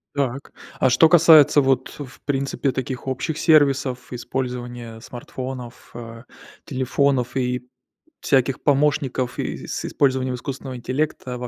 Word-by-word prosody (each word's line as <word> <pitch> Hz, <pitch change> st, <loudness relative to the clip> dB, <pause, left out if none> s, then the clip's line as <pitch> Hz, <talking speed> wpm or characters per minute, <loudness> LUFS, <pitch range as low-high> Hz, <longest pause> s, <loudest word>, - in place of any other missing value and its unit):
Так. 135 Hz, -1 st, -2 dB, 0.3 s
А 130 Hz, -, +4 dB
что 130 Hz, +6 st, +5 dB
касается, 155 Hz, -3 st, +7 dB
вот, 135 Hz, -1 st, 0 dB
в 130 Hz, -3 st, -10 dB
принципе, 140 Hz, 0 st, -1 dB
таких 130 Hz, 0 st, -5 dB
общих 130 Hz, +4 st, -2 dB
сервисов: 140 Hz, -5 st, +2 dB
использования 120 Hz, -2 st, -5 dB
смартфонов, 125 Hz, +1 st, -8 dB
э, 115 Hz, -1 st, -9 dB, 0.4 s
телефонов 130 Hz, -1 st, 0 dB
и 125 Hz, -1 st, -2 dB, 0.5 s
всяких 135 Hz, 0 st, +1 dB
помощников, 135 Hz, -3 st, +1 dB
и -, -, -4 dB
с -, -, -4 dB
использованием 130 Hz, -2 st, 0 dB
искусственного 130 Hz, +1 st, -6 dB
интеллекта 130 Hz, 0 st, -3 dB
во 125 Hz, 0 st, -5 dB
130 Hz, 120 wpm, -22 LUFS, 125-140 Hz, 0.5 s, касается